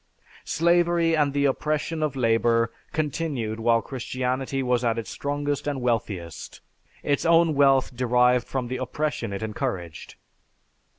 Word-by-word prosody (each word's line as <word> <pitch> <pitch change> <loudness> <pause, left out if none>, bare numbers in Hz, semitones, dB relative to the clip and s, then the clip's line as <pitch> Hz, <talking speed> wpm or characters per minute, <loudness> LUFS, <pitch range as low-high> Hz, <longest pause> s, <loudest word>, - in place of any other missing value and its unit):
Slavery 170 0 +3
and 145 -2 +2
the 140 0 +1
oppression 155 +3 -1
of 150 -3 -1
labor 115 -1 +2 0.2
continued 145 -7 -2
while 115 0 +2
Christianity 130 +1 -3
was 125 -1 +1
at 115 -1 +1
its 115 - -5
strongest 145 0 -3
and 145 -2 -1
wealthiest; 110 -9 -3 0.4
its 145 -1 0
own 165 -1 +4
wealth 135 -3 +3
derived 125 0 +3
from 130 -2 -3
the 130 +1 -3
oppression 130 -2 -3
it 100 +2 -4
encouraged. 90 -6 -4
130 Hz, 130 wpm, -25 LUFS, 115-145 Hz, 0.4 s, own